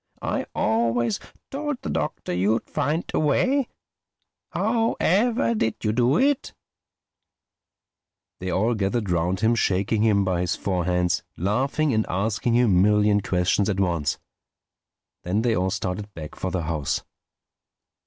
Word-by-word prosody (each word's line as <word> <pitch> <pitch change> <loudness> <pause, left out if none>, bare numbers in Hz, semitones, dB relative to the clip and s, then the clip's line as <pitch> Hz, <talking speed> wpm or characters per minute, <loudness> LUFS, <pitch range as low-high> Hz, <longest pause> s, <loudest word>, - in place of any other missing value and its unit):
I - - -2
always 115 +1 +1 0.3
told 290 0 -3
the - - -3
Doctor - - -3
you'd 100 +6 +1
find 150 +3 -1
a - - +2
way. 255 - +2 0.8
How 225 +2 +1
ever 230 +6 +2
did 165 - 0
you 105 - +1
do 125 +6 +2
it?" 280 +3 +1 1.8
They 95 - -4
all 105 +7 +1
gathered 105 -1 -1
round 90 +3 0
him 115 +1 +3
shaking 100 -1 +1
him 105 -3 +3
by 90 -2 0
his 90 - 0
four 90 -3 -2
hands, 90 -1 +1 0.2
laughing 130 - 0
and 110 0 +1
asking 110 +5 0
him 125 +1 +4
a 90 -1 +4
million 105 0 +3
questions 95 +2 +1
at 100 -1 -1
once. 85 -6 0 1.0
Then 100 +5 -1
they 120 -2 +2
all 95 0 +1
started 100 +1 -3
back 75 -2 -7
for 95 - -4
the 90 -2 -2
house. 75 -3 -2
105 Hz, 145 wpm, -24 LUFS, 90-125 Hz, 1.8 s, him